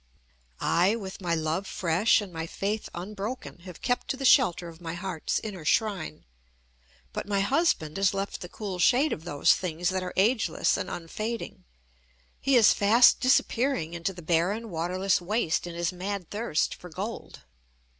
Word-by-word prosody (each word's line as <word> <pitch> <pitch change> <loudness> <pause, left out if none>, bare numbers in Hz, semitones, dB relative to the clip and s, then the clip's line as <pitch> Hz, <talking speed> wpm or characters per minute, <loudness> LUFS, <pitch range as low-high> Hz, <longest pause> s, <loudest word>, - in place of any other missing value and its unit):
I, 185 +6 +2
with 195 -4 -7
my 170 -2 0
love 160 +4 -2
fresh 180 +6 +2
and 195 -4 -8
my 165 0 -4
faith 205 +5 -3
unbroken, 205 +4 -6
have 180 -3 -11
kept 245 - 0
to 270 - -2
the 270 - -4
shelter 205 - +4
of 165 0 -12
my 165 0 -5
heart's 175 -2 -2
inner 200 -7 -7
shrine. 185 -2 -1 0.9
But - - -4
my 200 -1 +1
husband 200 - +1
has 195 -1 +3
left 195 0 -4
the 175 - -7
cool 195 -3 -6
shade 260 - +4
of 160 - -7
those 145 -5 +3
things 175 -1 -2
that 185 0 -1
are 180 -1 -4
ageless 215 -4 +2
and - - -3
unfading. 215 +7 -5 0.7
He 275 -1 +2
is 230 -4 +7
fast 225 +5 +5
disappearing 255 - +1
into 170 +2 -2
the 175 -2 -11
barren, 185 +7 0
waterless 180 +4 0
waste 175 -3 0
in 170 - -7
his 170 +1 -1
mad 185 0 -5
thirst 210 -7 0
for 180 - -11
gold. 200 +8 -6
190 Hz, 165 wpm, -27 LUFS, 170-215 Hz, 0.9 s, is